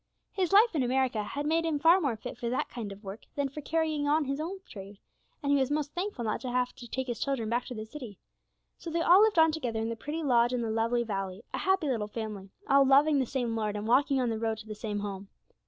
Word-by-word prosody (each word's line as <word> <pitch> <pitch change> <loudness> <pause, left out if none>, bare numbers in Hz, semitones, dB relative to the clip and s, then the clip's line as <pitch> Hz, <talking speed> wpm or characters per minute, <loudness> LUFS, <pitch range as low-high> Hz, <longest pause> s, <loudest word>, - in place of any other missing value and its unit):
His 375 -3 -1
life 425 +3 +6
in 305 - +1
America 255 -3 +1
had 280 +8 -4
made 325 +2 +2
him 320 -2 0
far 335 +6 +5
more 275 -7 0
fit 215 - -7
for 235 - -2
that 255 - -1
kind 225 -5 -6
of 200 +2 -11
work 200 +2 -7
than 285 -1 0
for 300 +3 -7
carrying 310 -1 0
on 300 +1 +2
his 275 +2 -2
old 375 +4 -6
trade, 200 0 -10 0.5
and 285 - +1
he 285 - +4
was 265 -1 +1
most 295 0 -1
thankful 355 - -3
not 215 - -1
to 255 - -4
have 250 0 0
to 240 - -10
take 260 +3 -3
his 240 -3 -4
children 265 -6 -1
back 240 +1 0
to 250 - -7
the 215 0 -5
city. 225 -4 -9 0.6
So 335 - -7
they 335 +1 0
all 360 +4 +7
lived 435 -4 +3
on 320 0 +6
together 250 -8 -3
in 225 +1 -2
the 230 - -3
pretty 300 +7 -5
lodge 240 -3 +3
in 245 - 0
the 225 -1 -2
lovely 230 +2 +1
valley, 195 -2 -4
a - - -2
happy 380 -3 +1
little 225 -6 -1
family, 210 -3 -6 0.2
all 275 0 +6
loving 280 +2 +5
the 260 - 0
same 240 -3 -2
Lord, 215 -2 -1
and 210 0 -4
walking 270 +3 +3
on 245 -2 +1
the 220 - -2
road 225 -1 -1
to 220 - -10
the 215 - -6
same 210 -1 -4
Home. 200 -1 -5
250 Hz, 270 wpm, -29 LUFS, 220-300 Hz, 0.6 s, all